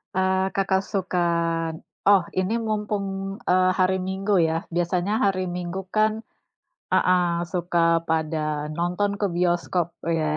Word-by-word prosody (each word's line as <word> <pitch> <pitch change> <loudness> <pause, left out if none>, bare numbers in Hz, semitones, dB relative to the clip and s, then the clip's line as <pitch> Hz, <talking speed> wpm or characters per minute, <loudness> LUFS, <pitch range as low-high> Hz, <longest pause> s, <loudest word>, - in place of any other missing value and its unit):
Eee, 190 0 +2
Kakak 190 -1 +2
sukan 170 -4 0 0.4
oh 200 -3 +6 0.2
ini 185 +4 0
mumpung, 210 -2 -1 0.4
eee, 185 0 +4
hari 185 0 +3
Minggu 195 +2 -1
ya. 160 - 0 0.2
Biasanya 175 +3 0
hari 195 -2 +1
Minggu 180 +1 -4 0.2
kan 215 0 +4 0.8
heeh, 180 0 +4 0.3
suka 175 -1 -1 0.3
pada 160 0 0 0.4
nonton 180 +5 0
ke 205 - +1
bioskop 175 -1 +1 0.3
ya. 160 - 0
185 Hz, 120 wpm, -24 LUFS, 175-195 Hz, 0.8 s, oh